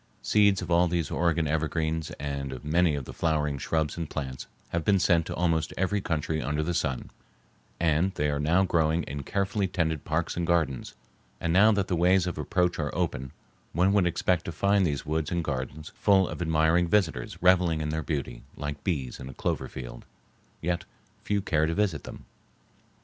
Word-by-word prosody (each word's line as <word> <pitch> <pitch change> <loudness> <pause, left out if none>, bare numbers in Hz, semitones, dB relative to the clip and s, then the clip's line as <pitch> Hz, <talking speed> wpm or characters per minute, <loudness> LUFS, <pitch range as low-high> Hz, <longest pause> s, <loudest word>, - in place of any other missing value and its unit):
Seeds 100 -2 +3
of - - -6
all 85 +1 +5
these 85 -3 -1
Oregon 85 -1 +1
evergreens 80 +1 -1
and 70 -1 -3
of 65 +2 -8
many 80 +1 +3
of 70 -3 -4
the - - -8
flowering 75 -4 0
shrubs 80 +3 -1
and 85 -3 -4
plants 65 -3 -5 0.2
have 85 -1 -1
been 100 +3 +4
sent 85 -3 +3
to - - -4
almost 80 -2 0
every 95 +2 0
country 80 -2 -1
under 75 +4 -1
the 85 +3 -1
sun, 75 -7 -2 0.7
and 85 +3 +2
they 75 - 0
are 70 - -1
now 80 +6 +3
growing 80 -2 +2
in 70 +1 -5
carefully 100 +5 -1
tended 80 -5 -1
parks 80 +2 -1
and 85 -1 -2
gardens. 80 -7 0 0.4
And 85 - -1
now 105 +4 +6
that 100 -2 0
the 90 - 0
ways 90 +2 +4
of 90 -3 -4
approach 90 +2 0
are 75 -2 -1
open 80 -7 -2 0.4
one 90 +4 +3
would 100 -4 +4
expect 90 0 0
to - - -3
find 100 +1 +2
these 70 -3 -3
woods 80 0 -1
and 85 -1 0
gardens 75 +2 -4
full 95 -3 +3
of - - -6
admiring 80 +1 +3
visitors 95 -3 0
reveling 90 -3 +4
in 75 -1 -2
their 80 +1 -1
beauty 70 -7 -4 0.2
like 75 0 -5
bees 70 -9 -2
in 65 - -7
a 65 - -10
clover - - -2
field. - - -8 0.6
Yet 85 +1 -1 0.4
few 100 -1 0
care 80 -5 +2
to 80 - -1
visit 95 -8 0
them. - - -10
80 Hz, 195 wpm, -27 LUFS, 75-90 Hz, 0.7 s, now